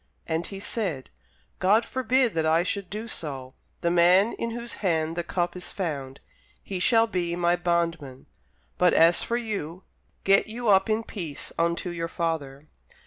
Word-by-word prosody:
And 165 +1 -2
he 195 - -7
said, 190 - -3 0.5
God 210 +5 +4
forbid 255 -1 +1
that 160 - 0
I 165 +2 +3
should 195 0 -3
do 215 +3 -5
so: 135 - -5 0.3
the 170 - +1
man 180 +5 +5
in 230 - -3
whose 235 +1 -5
hand 165 -4 0
the 175 - -1
cup 175 +1 -2
is 180 - -6
found, 140 -8 -4 0.4
he 190 -2 -4
shall 225 +4 +4
be 175 -6 -2
my 175 0 +2
bondman; 170 -6 -2 0.5
but 180 -1 +4
as 165 +1 +5
for 235 - -1
you, 195 -7 -4 0.4
get 195 +2 +4
you 230 +1 -3
up 195 +1 +5
in 220 +1 +1
peace 170 -10 -6
unto 170 +1 0
your 165 -1 -3
father. 155 -4 -3
175 Hz, 165 wpm, -26 LUFS, 165-210 Hz, 0.5 s, man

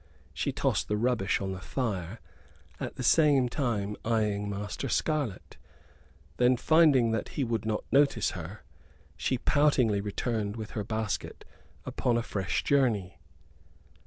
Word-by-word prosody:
She - - -1
tossed - - 0
the 105 - 0
rubbish 115 -3 +1
on 95 -1 -3
the 95 0 -6
fire, 105 -6 -3 0.6
at - - -5
the 130 - -5
same 140 -1 +4
time 115 -6 -2
eyeing 105 -3 0
Master 100 +6 -4
Scarlett. 145 - -2 0.8
Then, 125 +1 +4
finding 145 -5 +4
that 110 -1 -2
he 140 - +1
would 115 -2 -2
not 110 -1 -1
notice 140 -6 +3
her, 90 +4 -8 0.5
she 130 - -1
poutingly 125 -7 +2
returned 105 0 -2
with 110 -2 -7
her 105 - -3
basket 110 0 -4 0.4
upon 120 -2 0
a 120 - 0
fresh 95 -6 -2
journey. 115 -10 +1
115 Hz, 135 wpm, -29 LUFS, 100-130 Hz, 0.8 s, same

